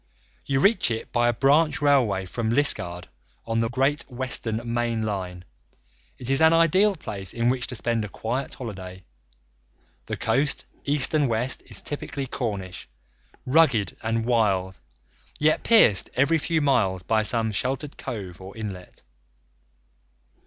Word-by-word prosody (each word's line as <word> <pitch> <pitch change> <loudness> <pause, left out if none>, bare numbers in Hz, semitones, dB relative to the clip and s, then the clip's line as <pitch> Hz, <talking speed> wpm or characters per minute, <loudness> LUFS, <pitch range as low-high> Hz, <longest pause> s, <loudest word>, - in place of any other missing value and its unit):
You 135 -1 +1
reach 200 - +3
it 115 -1 -4
by 120 0 +2
a - - +1
branch 145 +5 +3
railway 125 -10 +2
from 110 +5 -3
Liskeard, 90 -9 +1 0.4
on 115 0 -1
the 115 0 0
Great 135 +4 +1
Western 120 -3 -2
main 120 -2 -1
line. 90 -4 -4 0.7
It 125 - -8
is 135 +3 +1
an 160 0 +6
ideal 185 +5 +4
place 100 - -4
in 120 +1 +1
which 125 -1 -1
to - - -5
spend 115 -1 -1
a 105 - -6
quiet 120 +7 -4
holiday. 95 -6 -8 1.0
The - - -4
coast 135 +6 0 0.2
east 145 0 +3
and 150 -4 +2
west 120 +3 -1
is - - -3
typically 145 -1 -4
Cornish, 100 - -5 0.6
rugged 130 - +3
and 115 0 -1
wild, 100 -6 +1 0.6
yet 155 +1 +2
pierced 165 - +5
every 155 +5 +3
few 160 +1 0
miles 110 -11 +1
by 110 +4 +1
some 110 +1 +1
sheltered 135 +7 -3
cove 95 -6 -7
or 95 +3 -10
inlet. 95 -9 -8
120 Hz, 145 wpm, -24 LUFS, 105-140 Hz, 1.0 s, an